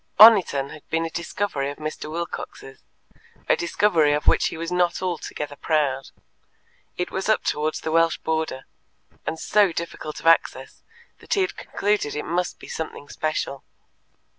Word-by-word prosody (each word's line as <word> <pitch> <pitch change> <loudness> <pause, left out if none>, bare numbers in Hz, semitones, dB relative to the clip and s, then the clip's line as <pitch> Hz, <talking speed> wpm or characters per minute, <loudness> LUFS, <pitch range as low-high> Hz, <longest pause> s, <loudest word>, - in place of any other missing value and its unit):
Oniton 190 -11 +7
had 155 - -10
been 165 0 0
a 165 - -5
discovery 170 -4 -2
of 145 - -7
Mr. 155 0 -5
Wilcox's 160 -4 -6 0.7
a - - +5
discovery 170 -4 +2
of 150 0 -1
which - - +4
he - - -5
was 165 +1 -4
not 180 -1 +1
altogether 150 -5 -4
proud. 140 -4 0 0.9
It 180 - -2
was 190 +2 -2
up 220 - +3
towards 155 +1 -1
the 160 - -3
Welsh 165 0 +3
border, 160 -4 -2 0.6
and 160 - -2
so 205 -3 +3
difficult 165 -2 -5
of - - -14
access 165 0 +2 0.4
that - - -2
he 395 - +2
had 375 - -1
concluded 205 -8 -1
it 150 - -3
must 175 +2 -1
be - - -12
something 155 -3 -6
special. 155 -3 -3
160 Hz, 160 wpm, -24 LUFS, 150-180 Hz, 0.9 s, Oniton